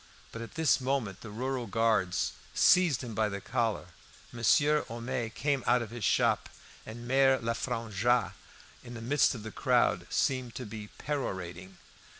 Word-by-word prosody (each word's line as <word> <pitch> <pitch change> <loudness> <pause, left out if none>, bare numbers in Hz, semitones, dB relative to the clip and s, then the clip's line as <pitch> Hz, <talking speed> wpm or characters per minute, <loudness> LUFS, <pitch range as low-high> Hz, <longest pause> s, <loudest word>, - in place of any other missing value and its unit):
But 115 - -7
at 115 - -9
this 160 -4 +3
moment 130 -7 -2
the 110 - -8
rural 125 +3 -3
guard 105 -4 +1 0.4
seized 175 -8 +4
him 120 -3 -6
by 110 0 +1
the 100 0 -4
collar. 110 -3 -2 0.4
Monsieur 145 +6 +3
Homais 120 0 -3
came 140 +3 -1
out 120 0 +4
of 110 - -9
his 120 -2 -6
shop, - - +2 0.4
and 120 +2 -8
Mere 135 +1 +4
Lefrangois, 115 -2 0 0.5
in 120 -1 -9
the - - -6
midst 145 +2 +3
of 110 - -8
the 110 - -6
crowd, - - +1
seemed 130 -3 0
to 125 - -5
be 105 -1 -8
perorating. 95 - -4
120 Hz, 155 wpm, -30 LUFS, 110-130 Hz, 0.5 s, seized